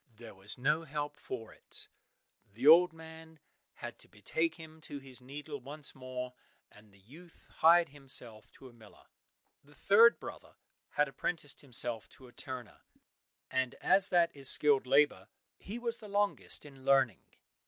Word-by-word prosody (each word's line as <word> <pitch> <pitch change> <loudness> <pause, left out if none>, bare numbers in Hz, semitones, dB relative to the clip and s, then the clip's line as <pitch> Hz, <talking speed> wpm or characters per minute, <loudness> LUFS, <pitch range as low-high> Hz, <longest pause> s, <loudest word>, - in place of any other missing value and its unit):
There 115 -1 -12
was 100 +2 -5
no 150 +6 +1
help 145 -1 -4
for 120 -6 -8
it, - - -11 0.6
the 120 +6 -6
old 170 +3 +8
man 160 0 -13 0.4
had - - -9
to - - -8
betake 160 +10 -2
him 160 -1 -13
to 145 - -8
his 135 -2 -7
needle 145 +3 -8
once 145 +3 -5
more, 125 -1 -6 0.4
and 105 0 -19
the 100 - -21
youth 160 - -17
hired 170 +1 +6
himself 130 -6 -6
to 135 - -14
a 125 - -16
miller. 110 -3 -18 0.6
The 145 +1 -21
third 230 +4 +5
brother - - -10 0.4
had 150 0 +2
apprenticed 145 +2 -5
himself 120 -5 -1
to 130 - -15
a - - -16
turner, 125 -5 -8 0.7
and 130 -1 -1
as 195 0 +4
that 170 -3 +2
is 135 -2 +4
skilled 140 -3 +4
labour, 135 -8 +3 0.3
he 210 +4 -7
was 235 -1 -3
the 215 -3 -12
longest 205 -5 0
in 135 -2 -14
learning. 135 -6 +3
140 Hz, 160 wpm, -32 LUFS, 125-160 Hz, 0.7 s, old